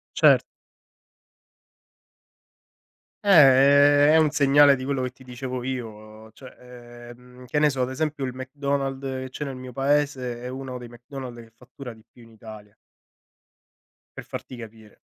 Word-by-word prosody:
Cert - - +5 2.8
Eh, 205 - -1
è 145 -2 +6
è - - +6
un 155 -1 +4
segnale 140 0 +5
di 130 - -7
quello 135 -1 -2
che 130 - -2
ti 130 - -19
dicevo 125 0 -6
io, 130 -2 -4
uhm, 110 +1 -15
cioè, 130 +3 -14 0.5
ehm, 125 +1 -15
che 135 - -3
ne 150 0 +4
so 135 - -3
ad 125 - -1
esempio 145 +1 -3
il 130 - -5
McDonald's 135 +1 -4 0.2
che 130 - -8
c'è 150 - -6
nel 135 -2 -6
mio 130 0 -9
paese 135 -3 -1
è 125 - -7
uno 130 0 -7
dei 120 -1 -10
McDonald's 120 +1 -10
che 115 -1 -14
fattura 125 +1 -11
di 110 -1 -20
più 120 - -20
in 115 - -18
Italia 110 -2 -13 1.4
per - - -7
farti 130 - -8
capire. 110 -2 -13
130 Hz, 160 wpm, -24 LUFS, 120-140 Hz, 2.8 s, è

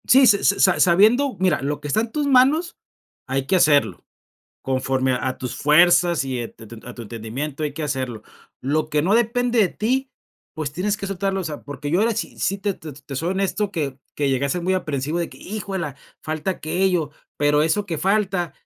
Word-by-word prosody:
Sí, 265 +1 +7
se 205 -4 +4
se 200 - +3
sa 190 - +5
sa - - -5
sabiendo, 220 +10 +4
mira, 185 -4 +2
lo 145 +2 -2
que 145 - -7
está 180 +9 +1
en 230 0 -4
tus 295 +2 -1
manos 280 +6 +3 0.5
hay 135 +1 -1
que 190 - +2
hacerlo, 150 -5 +3 0.6
conforme 130 0 0
a 125 +1 -1
a 130 - -5
tus 125 - -5
fuerzas 170 +1 +4
y 130 -2 -3
e 115 - -4
te 110 - -15
te 115 +1 -11
a 125 - -8
tu 120 - -8
entendimiento 120 +7 -5
hay 150 -2 -1
que 155 - -6
hacerlo, 130 -6 -3 0.4
lo 155 +3 -1
que 150 -1 +1
no 190 +6 +2
depende 240 +1 +1
de 200 - +4
ti, 260 +8 -1 0.4
pues 155 -3 -4
tienes 200 +6 -1
que 195 - -4
soltarlo, 195 0 -2
o - - -4
sea, 155 -3 -6
porque 145 0 -6
yo 175 +5 +2
ahora 230 +2 +2
sí 220 - -5
sí 195 - 0
te 200 0 -1
te 145 -4 -9
soy 165 +6 -1
honesto 195 +2 -1
que 140 -6 -3 0.2
que 145 -1 0
llegué 135 0 +1
a - - 0
ser 180 +3 -2
muy 185 +2 +1
aprehensivo 150 -3 -2
de 170 - -2
que: - - -14
"¡Híjuela!, 190 -8 -5 0.3
falta 155 +4 -2
aquello", 175 -2 0 0.3
pero 150 0 +3
eso 200 +6 0
que 170 -4 -3
falta, 190 -1 0
165 Hz, 220 wpm, -22 LUFS, 140-200 Hz, 0.6 s, Sí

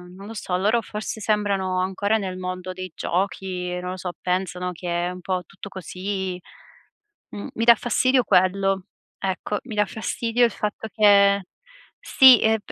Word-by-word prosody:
non 195 +2 -11
lo 225 - -8
so, 190 -4 -3
loro 215 +5 +2
forse 215 0 -6
sembrano 200 -3 0
ancora 190 +3 0
nel 190 -3 -4
mondo 185 0 -5
dei 185 -1 -7
giochi, 180 -1 -2
non 180 0 -5
lo 185 - -6
so, 180 0 -4
pensano 180 0 -2
che 175 0 -2
è - - -2
un 180 - -8
po' 185 0 -2
tutto 195 +3 -11
così 190 0 -4 0.9
mhmm, 205 - -7
mi 230 - -1
dà 235 0 +8
fastidio 255 +3 +2
quello, 190 0 +2 0.3
ecco, 195 +2 -2
mi 245 -4 -7
dà 210 0 +3
fastidio 230 +3 0
il 235 - +3
fatto 210 +1 -4
che 200 -2 +5 0.6
sì, 260 - +7
ehm, 220 0 +3
195 Hz, 165 wpm, -23 LUFS, 185-210 Hz, 0.9 s, dà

